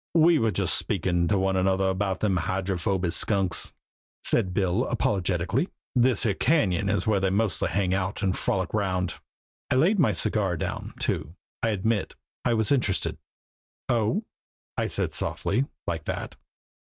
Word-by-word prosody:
"We 165 Hz, 0 st, +6 dB
were 115 Hz, -, +2 dB
just -, -, +1 dB
speakin' 85 Hz, -2 st, 0 dB
to 100 Hz, -, +2 dB
one 95 Hz, 0 st, +1 dB
another 95 Hz, +1 st, +2 dB
about 95 Hz, 0 st, -1 dB
them 100 Hz, -4 st, +2 dB
Hydrophoby 95 Hz, 0 st, -1 dB
Skunks," 95 Hz, -1 st, +2 dB, 0.5 s
said 100 Hz, -6 st, +2 dB
Bill 95 Hz, +5 st, +1 dB
apologetically. 100 Hz, -, 0 dB, 0.3 s
"This 125 Hz, 0 st, +3 dB
here 105 Hz, -, +2 dB
Cañon 100 Hz, -, +2 dB
is 100 Hz, -, 0 dB
where 105 Hz, -3 st, +2 dB
they 95 Hz, 0 st, +1 dB
mostly 100 Hz, +2 st, 0 dB
hang 95 Hz, -2 st, 0 dB
out 95 Hz, +2 st, -2 dB
and 95 Hz, -1 st, +1 dB
frolic 95 Hz, -2 st, -1 dB
'round." 95 Hz, -5 st, -1 dB, 0.5 s
I -, -, +2 dB
laid 175 Hz, +11 st, +4 dB
down -, -, +4 dB
my 140 Hz, -, +4 dB
cigar, 95 Hz, -5 st, 0 dB, 0.4 s
too. 80 Hz, -, -2 dB, 0.3 s
I 115 Hz, -, +1 dB
admit 105 Hz, 0 st, -1 dB, 0.3 s
I 120 Hz, -2 st, +2 dB
was 110 Hz, +2 st, +1 dB
interested. 120 Hz, -9 st, 0 dB, 0.7 s
"Oh!" 120 Hz, -, +1 dB, 0.5 s
I -, -, 0 dB
said -, -, -1 dB
softly 120 Hz, +7 st, 0 dB, 0.2 s
like 80 Hz, -3 st, -3 dB
that. -, -, -4 dB
100 Hz, 155 wpm, -26 LUFS, 95-115 Hz, 0.7 s, We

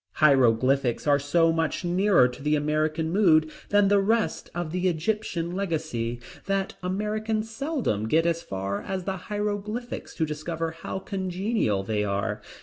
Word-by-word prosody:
Hieroglyphics 130 Hz, -2 st, +3 dB
are 145 Hz, -1 st, +4 dB
so 165 Hz, +4 st, +3 dB
much 165 Hz, +2 st, -1 dB
nearer 180 Hz, -5 st, +4 dB
to 125 Hz, +2 st, -9 dB
the 150 Hz, +2 st, +2 dB
American 155 Hz, +2 st, 0 dB
mood 160 Hz, -5 st, +4 dB, 0.2 s
than 205 Hz, -1 st, +4 dB
the 200 Hz, 0 st, +4 dB
rest 220 Hz, +3 st, 0 dB
of 175 Hz, -3 st, -3 dB
the 180 Hz, +1 st, 0 dB
Egyptian 175 Hz, 0 st, -1 dB
legacy, 155 Hz, -11 st, -2 dB, 0.3 s
that 195 Hz, -1 st, 0 dB
Americans 215 Hz, +4 st, -2 dB
seldom 225 Hz, -, -1 dB
get 160 Hz, +7 st, +3 dB
as 170 Hz, 0 st, +1 dB
far 95 Hz, -, -3 dB
as 190 Hz, -1 st, -4 dB
the 190 Hz, +1 st, -3 dB
Hieroglyphics 210 Hz, +4 st, -4 dB
to 160 Hz, -, +1 dB
discover 160 Hz, +2 st, -3 dB
how 165 Hz, +3 st, -6 dB
congenial 190 Hz, -, -1 dB
they 105 Hz, 0 st, -1 dB
are. 105 Hz, +1 st, -2 dB
165 Hz, 145 wpm, -26 LUFS, 145-200 Hz, 0.3 s, are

